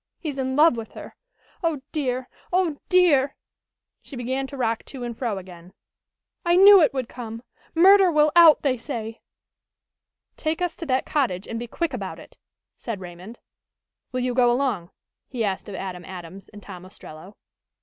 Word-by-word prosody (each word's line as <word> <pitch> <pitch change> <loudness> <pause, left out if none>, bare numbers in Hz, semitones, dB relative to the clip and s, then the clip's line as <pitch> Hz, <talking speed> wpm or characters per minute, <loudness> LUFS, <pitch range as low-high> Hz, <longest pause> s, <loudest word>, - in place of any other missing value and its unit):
He's 290 -5 -5
in 260 0 -2
love 300 -4 +5
with 225 -1 -7
her. - - -10 0.5
Oh, 315 -5 -1
dear! 260 -4 -2 0.2
Oh, 355 -4 +1
dear!" 315 -7 +4 0.7
she 280 - -11
began 260 +2 -3
to 275 - -9
rock 230 -3 -1
to 265 -3 -9
and 240 -1 -5
fro 225 -4 -3
again. 180 -1 -12 0.7
"I 345 0 +3
knew 395 +1 +9
it 305 - +4
would 260 -3 -3
come! 230 -2 -8 0.3
Murder 380 +2 +6
will 300 -1 +3
out, 335 -3 +7
they 265 -3 +1
say!" 230 -3 -6 1.2
"Take 315 +1 -2
us 355 -2 -2
to 335 - -7
that 260 -1 0
cottage 230 -11 -1
and 230 - -4
be 240 - -6
quick 330 +5 -3
about 195 -6 -5
it," - - -16 0.4
said 230 -5 -5
Raymond. 180 +5 -10 0.7
"Will 255 - -2
you 250 0 -1
go 245 -1 +4
along?" 240 -9 -1 0.4
he 245 -3 -3
asked 195 +1 -3
of 200 - -7
Adam 180 -1 -6
Adams 185 +1 -10
and 205 -1 -13
Tom 180 -3 -10
Ostrello. 185 0 -13
250 Hz, 170 wpm, -24 LUFS, 205-300 Hz, 1.2 s, knew